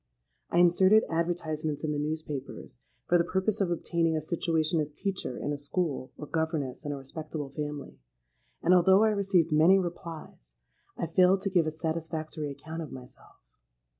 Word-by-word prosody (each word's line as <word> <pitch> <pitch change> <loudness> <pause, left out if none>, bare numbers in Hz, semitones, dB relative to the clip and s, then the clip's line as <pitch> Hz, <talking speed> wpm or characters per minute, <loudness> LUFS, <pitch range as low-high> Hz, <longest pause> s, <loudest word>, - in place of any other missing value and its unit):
I - - 0
inserted 185 +5 +6
advertisements 165 -3 -2
in 155 - 0
the 145 - -1
newspapers, 150 -4 -5 0.3
for 175 - +4
the - - +4
purpose 190 +4 -1
of 190 - +2
obtaining 165 -1 0
a - - -2
situation 160 0 0
as 150 -1 -1
teacher 185 -5 -4
in 145 - -2
a 145 - -5
school 145 -3 -2
or - - -6
governess 160 -5 -2
in 145 - -3
a 145 - -3
respectable 145 +1 -6
family; 145 - -6 0.6
and 175 - +5
although 190 +3 +6
I 220 - +5
received 195 -5 +2
many 160 +5 +6
replies, 165 - -6 0.4
I - - -1
failed 185 +3 +4
to 195 -1 -2
give 175 -4 +3
a - - 0
satisfactory 160 -1 -4
account 155 +4 -7
of 155 - -7
myself. 125 -1 -13
160 Hz, 165 wpm, -29 LUFS, 150-175 Hz, 0.6 s, inserted